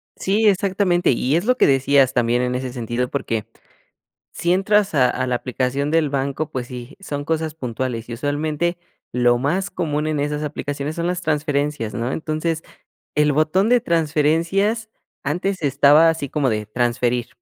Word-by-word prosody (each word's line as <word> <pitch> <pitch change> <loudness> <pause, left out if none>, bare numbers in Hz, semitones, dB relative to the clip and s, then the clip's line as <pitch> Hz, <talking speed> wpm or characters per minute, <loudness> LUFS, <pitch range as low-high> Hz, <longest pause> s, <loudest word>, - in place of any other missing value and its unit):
Sí, 210 +3 +1
exactamente, 190 -2 +2
y 130 +3 +1
es 175 +4 0
lo 250 +2 +2
que - - +5
decías 135 -1 +3
también 120 0 +2
en 125 0 -1
ese 125 -1 -4
sentido 120 0 -2
porque 115 -6 -2 0.9
si 175 +1 0
entras 200 +1 +2
a 130 -4 +4
a 130 +1 -1
la 125 - 0
aplicación 130 +3 -1
del 160 -2 +2
banco, 140 +2 -2
pues 125 -4 -4
sí, 125 +2 -9
son 145 -7 -5
cosas 160 -1 -2
puntuales, 125 -4 -4
y - - -4
usualmente 150 +6 -1 0.3
lo 120 -1 +3
más 175 +8 -1
común 150 -4 -2
en 155 -1 -1
esas 150 +1 -2
aplicaciones 145 0 -4
son 170 0 -2
las 180 0 -2
transferencias, 145 -6 -1
¿no?, 120 +2 -2
entonces 160 +1 -2 0.5
el 150 0 +3
botón 155 +8 +2
de 245 0 +4
transferencias 170 +6 +1 0.3
antes 180 +6 -2
estaba 145 +3 +5
así 160 -4 -1
como 145 -3 0
de 105 -2 -1
transferir 120 +1 0
150 Hz, 165 wpm, -21 LUFS, 130-165 Hz, 0.9 s, que